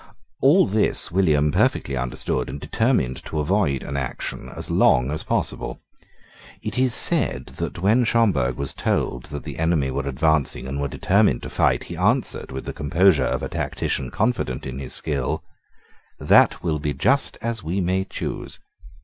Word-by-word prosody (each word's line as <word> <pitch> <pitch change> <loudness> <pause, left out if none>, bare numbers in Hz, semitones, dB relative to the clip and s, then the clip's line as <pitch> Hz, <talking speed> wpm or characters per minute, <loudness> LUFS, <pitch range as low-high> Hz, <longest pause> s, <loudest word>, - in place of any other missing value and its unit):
All 150 +9 +5
this 105 -3 +3
William 75 -5 +2
perfectly 70 -1 +1
understood, 65 0 -2
and 70 - -6
determined 95 - 0
to 80 - -5
avoid 75 -3 0
an 70 - -6
action 65 -2 -5
as - - -7
long 65 +3 +3
as 75 - -3
possible. - - -3 0.8
It 105 +2 -4
is 130 -2 +6
said 65 - +4
that, - - -4
when 110 +6 +4
Schomberg 100 - +1
was 70 0 -4
told 60 0 -2
that 75 -2 -7
the - - -8
enemy 80 -5 +1
were 70 +1 -3
advancing 75 -1 0
and 70 +2 -4
were 70 - -1
determined 95 - +1
to - - -7
fight, - - +1
he - - -8
answered, - - 0
with 65 0 -6
the - - -5
composure 80 -1 +2
of - - -2
a - - -2
tactician 65 - -3
confident 65 0 -1
in 65 0 -6
his 65 -2 -5
skill, 70 -5 -2 0.7
"That - - +4
will 80 -3 -1
be 75 -1 -3
just 135 - +1
as 115 -2 -3
we 85 +5 -2
may 95 +1 0
choose." - - -6
75 Hz, 165 wpm, -22 LUFS, 65-95 Hz, 0.8 s, is